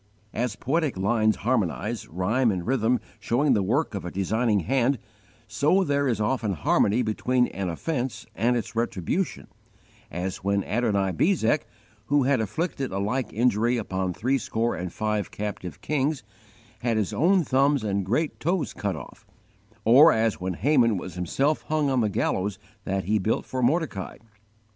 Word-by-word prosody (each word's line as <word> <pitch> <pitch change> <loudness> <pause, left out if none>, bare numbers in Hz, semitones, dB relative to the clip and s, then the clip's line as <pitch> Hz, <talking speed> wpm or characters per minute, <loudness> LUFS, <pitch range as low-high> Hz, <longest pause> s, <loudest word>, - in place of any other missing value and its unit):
As 120 -2 -1
poetic 145 - -1
lines 110 +2 +2
harmonize, 110 -1 -1
rhyme 105 +9 +1
and 90 -4 -2
rhythm 125 0 +2 0.2
showing 135 +4 +2
the 105 - +2
work 120 +9 0
of 100 - -4
a 90 - -4
designing 105 +3 +1
hand, 130 +6 +1 0.5
so 145 - +2
there 140 -3 +1
is 115 -5 0
often 110 -1 0
harmony 100 +8 +2
between 125 +3 +1
an 95 -1 -3
offense 130 - -3
and 120 +3 +1
its 115 0 -5
retribution, 115 - -2 0.6
as 90 +2 -3
when 100 +1 0
Adonibezek, 110 - +1 0.4
who 145 -1 +3
had 130 -2 +2
afflicted 135 - -2
a 95 - -3
like 110 +6 -1
injury 120 +1 +2
upon 95 -4 -2
threescore 115 +3 -1
and 90 -1 -5
five 105 0 -2
captive 100 -4 -6
kings, 145 -2 -1 0.6
had 115 -1 0
his 105 -3 -1
own 180 +3 +3
thumbs 140 -1 +2
and 100 -2 0
great 135 - -1
toes 175 +1 -1
cut - - -2
off, - - -11 0.6
or 140 +9 +8
as 110 -5 0
when 90 -1 -2
Haman 120 - +3
was 90 0 -6
himself 135 - 0
hung 155 -3 +1
on 130 -2 +2
the 110 - +1
gallows 100 0 -1 0.3
that 95 0 -1
he 105 +4 +1
built 110 +4 0
for 130 - -3
Mordecai. 130 - 0
115 Hz, 155 wpm, -25 LUFS, 100-135 Hz, 0.6 s, or